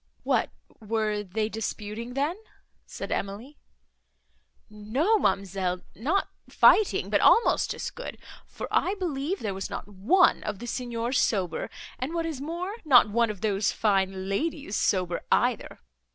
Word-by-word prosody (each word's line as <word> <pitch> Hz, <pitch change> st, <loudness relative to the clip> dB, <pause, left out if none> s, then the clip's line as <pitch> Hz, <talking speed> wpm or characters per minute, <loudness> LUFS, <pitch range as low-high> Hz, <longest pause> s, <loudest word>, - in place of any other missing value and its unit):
"What, -, -, +1 dB, 0.3 s
were 215 Hz, -1 st, -1 dB
they 210 Hz, +2 st, -2 dB
disputing, 220 Hz, +2 st, -5 dB
then?" 290 Hz, +5 st, 0 dB, 0.5 s
said -, -, -7 dB
Emily. 215 Hz, +9 st, -4 dB, 1.1 s
"No, 245 Hz, -, +1 dB
ma'amselle, 190 Hz, -, 0 dB
nor 315 Hz, -, 0 dB, 0.3 s
fighting, 430 Hz, -, +4 dB
but -, -, +3 dB
almost 465 Hz, -, +4 dB
as -, -, -4 dB
good, -, -, -8 dB, 0.3 s
for -, -, -7 dB
I 390 Hz, -, +2 dB
believe 350 Hz, -1 st, -2 dB
there 205 Hz, -3 st, -2 dB
was 190 Hz, 0 st, -5 dB
not -, -, -6 dB
one 210 Hz, -, +3 dB
of 205 Hz, -2 st, -4 dB
the 240 Hz, -, -8 dB
Signors 240 Hz, 0 st, -2 dB
sober; 185 Hz, -6 st, -1 dB, 0.3 s
and 275 Hz, +7 st, -3 dB
what 335 Hz, -1 st, -1 dB
is 310 Hz, -5 st, -4 dB
more, 345 Hz, +8 st, -4 dB
not 250 Hz, -8 st, +6 dB
one 235 Hz, +1 st, +2 dB
of 205 Hz, -3 st, -6 dB
those 205 Hz, -2 st, +1 dB
fine 190 Hz, -2 st, 0 dB
ladies 275 Hz, +1 st, -2 dB
sober, 180 Hz, -3 st, +1 dB
either. -, -, +1 dB
225 Hz, 140 wpm, -27 LUFS, 200-295 Hz, 1.1 s, not